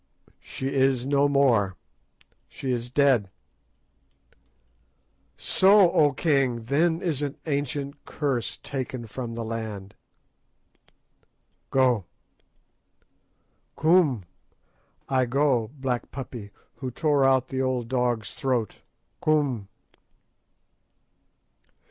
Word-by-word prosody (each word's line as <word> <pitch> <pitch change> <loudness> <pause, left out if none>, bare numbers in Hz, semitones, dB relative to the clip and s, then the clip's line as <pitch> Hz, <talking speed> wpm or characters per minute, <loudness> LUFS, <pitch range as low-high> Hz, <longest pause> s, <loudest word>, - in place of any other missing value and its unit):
"She 130 - -5
is 130 -2 +2
no 140 +1 +3
more; 115 -10 +2 0.7
she 130 - -4
is 120 -1 -2
dead." 125 -7 +3 2.1
"So, 195 -2 +5
O 150 -3 +4
king! 130 -5 +1
then 160 +7 +1
is 155 -6 -1
an 145 -1 -3
ancient 140 -1 -3
curse 135 -6 -2
taken 130 -3 -5
from 115 +1 -6
the 115 - -4
land." 110 -3 -5 1.8
"Go!" 125 -7 +2 1.7
"Koom! 155 - +3 0.8
I 130 -2 +1
go, 130 -4 +1
Black 130 -3 -2
Puppy, 120 -6 -7 0.3
who 130 - -4
tore 145 +2 +1
out 130 -1 +3
the 130 0 -2
old 130 -3 -1
dog's 120 -3 -1
throat. 125 -5 -2 0.4
_Koom! 140 -9 +1
130 Hz, 90 wpm, -26 LUFS, 120-140 Hz, 2.1 s, So